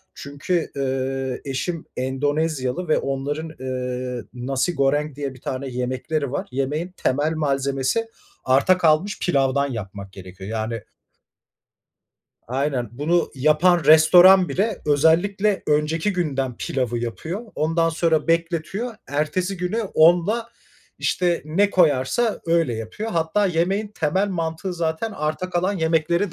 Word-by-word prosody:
çünkü 145 +5 -3
eee, 135 -1 -2
eşim 165 +5 -3
Endonezyalı 145 +3 -1
ve 155 - +3
onların 145 +4 -3
eee, 125 -1 -4
nasi 130 +7 -1
goreng 145 +1 +1
diye 140 -2 -4
bir 125 - -16
tane 135 +1 -4
yemekleri 130 +3 -2
var. 145 - -3
Yemeğin 150 +7 -2
temel 145 +4 0
malzemesi 140 +6 0 0.4
arta 135 +8 +4
kalmış 170 +4 +2
pilavdan 140 -4 +1
yapmak 100 -4 -7
gerekiyor 95 +1 -10
yani 110 0 -3 1.7
Aynen, 130 -2 -1
bunu 160 +7 0
yapan 155 +4 +3
restoran 175 +4 +7
bile 200 +8 -1
özellikle 180 +7 +2
önceki 155 +6 +1
günden 135 -8 -2
pilavı 125 -3 -2
yapıyor. 155 - -4
Ondan 165 +2 +1
sonra 165 -1 +1
bekletiyor. 170 +8 -1
Ertesi 155 +7 -1
günü 180 +6 -2
onla, 180 +8 +4 0.5
işte, 175 -2 0
ne 195 +7 +2
koyarsa 170 - +2
öyle 165 -7 +2
yapıyor. 115 - -5
Hatta 170 +4 +1
yemeğin 190 +4 0
temel 190 +1 0
mantığı 165 0 -3
zaten 165 +6 -2
arta 155 +4 -3
kalan 180 +2 0
yemekleri 165 +3 +1
155 Hz, 120 wpm, -22 LUFS, 135-175 Hz, 1.7 s, restoran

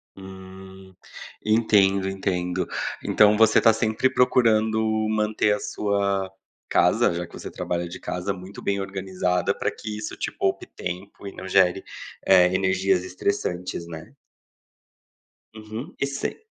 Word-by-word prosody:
Hum. 95 0 -12 0.5
Entendo, 100 -3 +3
entendo. 90 -2 -2 0.4
Então 105 0 +4
você 110 0 +5
tá 115 - +6
sempre 110 +3 +1
procurando 110 -4 +3 0.3
manter 105 -1 +1
a 105 - -2
sua 100 -2 -1 0.4
casa, - - +3
já 85 +1 -3
que - - -19
você - - -7
trabalha 85 0 -3
de 85 - -9
casa, 90 +2 -3
muito 95 +1 -10
bem 100 0 -1
organizada, 95 -2 -1
pra - - -1
que 105 -1 -7
isso 105 0 -5
te - - -3
poupe 95 - -1
tempo 95 +3 -7
e - - -6
não 95 - -8
gere, 95 0 +3 0.4
eh, 90 -1 +5
energias 95 -1 +1
estressantes, 90 -2 -3
né. 80 -1 -10 1.4
Uhum. 110 - -8
E - - +1
sem 140 0 -4
95 Hz, 135 wpm, -24 LUFS, 95-105 Hz, 1.4 s, tá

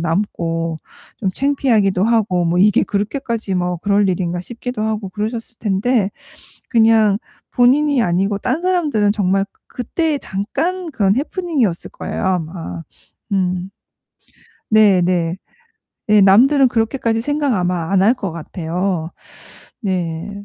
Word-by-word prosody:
남고 165 -2 -2 0.4
좀 195 - -1
창피하기도 225 -8 +1
하고 215 -6 +2
'뭐 170 +1 +1
이게 205 +2 +4
그렇게까지 215 -1 -2
뭐 180 -1 -1
그럴 200 +2 +2
일인가?' 175 -1 -1
싶기도 240 +1 -5
하고 215 -2 -2
그러셨을 225 +5 -5
텐데 210 +1 +1 0.6
그냥 220 -3 +4 0.4
본인이 270 +2 +3
아니고 195 +2 0
딴 255 +9 -1
사람들은 305 - +1
정말 195 -1 +1
그 - - -40
그때 300 +5 -1
잠깐 320 - -3
그런 200 -4 +2
해프닝이었을 285 - -1
거예요, - - -5
아마. 165 - -3 0.5
음. 185 -1 -1 1.0
네네. 180 -5 +3 0.8
예. 210 -1 +6
남들은 255 +8 +5
그렇게까지 225 -1 0
생각 290 -1 0
아마 180 -3 -1
안 190 -1 +3
할 225 +5 +5
것 200 -8 -4
같아요. 170 +1 -3 0.7
네. 185 0 -3
205 Hz, 265 characters per minute, -18 LUFS, 180-240 Hz, 1.0 s, 예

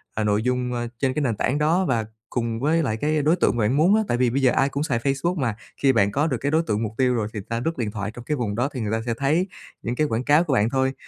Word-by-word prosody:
ờ, 110 - 0
nội 105 +1 +1
dung, 125 0 -1
ơ, 120 0 -2
trên 135 -2 +1
cái 150 - -1
nền 120 -6 0
tảng 130 +7 0
đó 165 +5 +2
và 115 -5 0 0.2
cùng 115 -2 -2
với 160 +4 +2
lại 110 -4 -1
cái 150 +3 0
đối 155 +4 +3
tượng 170 - +1
mà - - +1
bạn 130 - +1
muốn 180 +7 +5
á, 220 - +3
tại 120 - 0
vì 125 -1 +2
bây 135 +4 0
giờ 130 -2 +4
ai 135 +1 +2
cũng 140 +2 -2
xài 125 -7 0
Facebook 140 +7 0
mà, 115 -7 -1 0.2
khi 135 - +3
bạn 100 -3 +3
có 145 +7 +1
được 130 -6 -1
cái 140 +4 -2
đối 160 +2 +3
tượng 110 -7 -1
mục 105 - -3
tiêu 130 -1 +3
rồi, 110 -3 -1
thì 105 - -4
ng 95 - -8
ta 115 0 -1
lướt 165 - -1
điện 115 -4 -2
thoại 105 0 -4
trong 120 +1 -10
cái 150 - -1
vùng 105 -4 -2
đó, 125 +4 0
thì 125 - -4
người 105 - -2
ta 110 0 0
sẽ 115 - 0
thấy 150 - +1 0.3
những 120 +2 -3
cái 150 +2 +1
quảng 115 +1 -1
cáo 150 +5 +4
của 150 - -1
bạn 110 -2 +3
thôi. 130 0 +1
130 Hz, 330 wpm, -23 LUFS, 115-150 Hz, 0.3 s, muốn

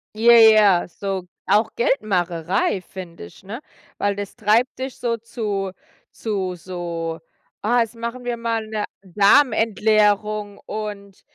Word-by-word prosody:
Ja, 230 +2 +5
ja, 215 -6 +6
so 190 0 -5 0.2
auch 215 +3 +3
Geldmacherei, 185 - 0
finde 180 - -10
ich, 85 - -16
ne? 220 +6 -7 0.4
Weil 200 0 0
das 205 -1 -6
treibt 230 +3 +1
dich 265 0 -4
so 230 -1 -1
zu- 210 -4 -4 0.4
zu 190 -5 -3
so: 170 -2 -5 0.4
„Ah, 240 +3 +2
jetzt 230 0 -2
machen 235 +2 -5
wir 240 -1 -3
mal 230 -1 -2
'ne 215 -1 -3 0.2
Darm-Entleerung 210 -1 +2
und 205 -2 -7
210 Hz, 125 wpm, -21 LUFS, 190-230 Hz, 0.4 s, ja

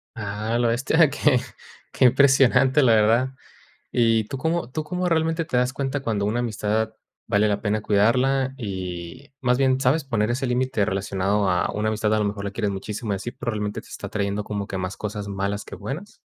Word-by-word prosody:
Ah 105 +1 -3
a - - +2
la 120 - +2
bestia, 135 +7 +3
que 145 -2 +2 0.5
que - - +2
impresionante, 135 +1 +5
la 120 -3 +5
verdad, 115 +4 +3 0.6
¿y 115 -2 +3
tú 120 - -6
cómo 160 -2 -1
tú 155 +4 -3
cómo 180 +3 -2
realmente 165 0 +1
te 155 - -2
das 125 +1 +2
cuenta 140 +1 -2
cuando 110 -6 -1
una 110 +4 0
amistad 110 -1 -1 0.3
vale 105 -1 +2
la 100 - 0
pena 105 0 0
cuidarla? 125 +6 +2
Y, 95 - -6
más 125 -1 +2
bien, 130 -1 +2
¿sabes 140 +4 +2
poner 115 -4 0
ese 130 +3 -1
límite 125 -3 +1
relacionado 100 0 0
a 90 -1 +1
una 105 +1 -1
amistad? 110 0 +1
A - - +2
lo 105 - +1
mejor 100 0 -3
la 100 - -2
quieres 105 0 -2
muchísimo, 105 +3 -4
y - - 0
así, 100 +5 -5
pero, 120 -1 -4
¿realmente 105 -2 -3
te - - -19
está - - -7
trayendo 100 0 -2
como 100 -1 -4
que 95 - -4
más 90 +1 -4
cosas 105 -1 -5
malas, 100 +1 -3
que - - -9
buenas? 140 - -7
115 Hz, 205 wpm, -24 LUFS, 105-130 Hz, 0.6 s, impresionante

